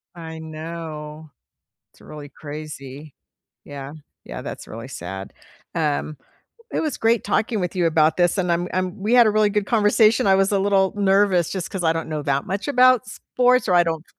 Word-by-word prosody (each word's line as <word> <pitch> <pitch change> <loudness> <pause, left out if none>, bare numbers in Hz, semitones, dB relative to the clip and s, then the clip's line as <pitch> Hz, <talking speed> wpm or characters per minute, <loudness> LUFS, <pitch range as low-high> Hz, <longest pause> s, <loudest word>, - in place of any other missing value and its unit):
I 160 -1 -8
know. 155 -1 -8 0.6
It's - - -23
really 150 -1 -10
crazy. 145 -1 -9 0.5
Yeah. 140 0 -8 0.3
Yeah, - - -7
that's - - -8
really 115 +4 -8
sad, 95 -2 -7 0.4
um, 150 -1 -1 0.5
it - - -1
was 305 -4 -3
great 225 0 +2
talking 215 +1 0
with 180 +1 -3
you 175 -2 +1
about 155 -1 +3
this, 175 +2 +2
and 180 -2 +1
I'm 175 +1 -1
I'm 185 +2 -2
we 225 +4 +1
had 240 -2 +7
a 215 - +4
really 215 0 +3
good 210 -1 -1
conversation, 220 0 +3
I 190 - +5
was 195 +1 +2
a 200 - +3
little 195 -1 +2
nervous 195 -3 +2
just 190 -2 -4
'cause 190 -4 -4
I 160 -1 +3
don't 165 -1 -4
know 155 -1 -3
that 140 0 -1
much 195 +5 -3
about 255 -3 +4
sports, 250 +2 +1
or 180 - +3
I 175 - +6
don't 165 -2 -3
175 Hz, 190 wpm, -22 LUFS, 155-205 Hz, 0.6 s, had